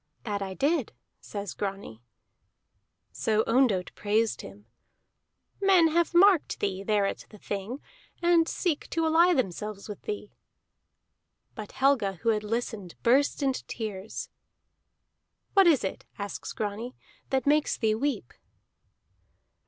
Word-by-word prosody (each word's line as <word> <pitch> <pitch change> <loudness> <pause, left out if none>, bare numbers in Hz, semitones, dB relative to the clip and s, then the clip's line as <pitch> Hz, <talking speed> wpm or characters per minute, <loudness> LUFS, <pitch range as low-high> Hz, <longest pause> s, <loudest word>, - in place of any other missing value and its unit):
"That 205 -3 -3
I 190 -1 -4
did," 285 - 0 0.3
says 200 -3 -6
Grani. 195 - -5 1.1
So 220 0 +1
Ondott 230 -8 +2
praised 215 +2 0
him. 100 +2 -12 1.0
"Men 375 -4 +5
have 340 +2 +1
marked 370 -2 +5
thee, 195 -1 -1
there 205 0 +1
at - - -4
the 210 - -13
Thing, 205 +6 -5 0.4
and 340 -1 +4
seek 325 -5 -2
to 330 0 0
ally 335 +3 +5
themselves 210 - -3
with 210 - -8
thee." 420 -1 -6 1.2
But 215 -2 -8
Helga, 265 -8 +2
who 230 +6 -2
had 215 -1 +1
listened, 210 -4 -3
burst 280 +4 +3
into 265 -1 0
tears. 210 -2 -5 1.2
"What 390 -2 +6
is 305 -7 +4
it," 190 - -4
asks 200 -1 -5
Grani, 220 +4 -4 0.3
"that 265 -2 0
makes 295 +1 +2
thee 220 -3 +2
weep?" 225 - -2
225 Hz, 125 wpm, -28 LUFS, 200-290 Hz, 1.2 s, What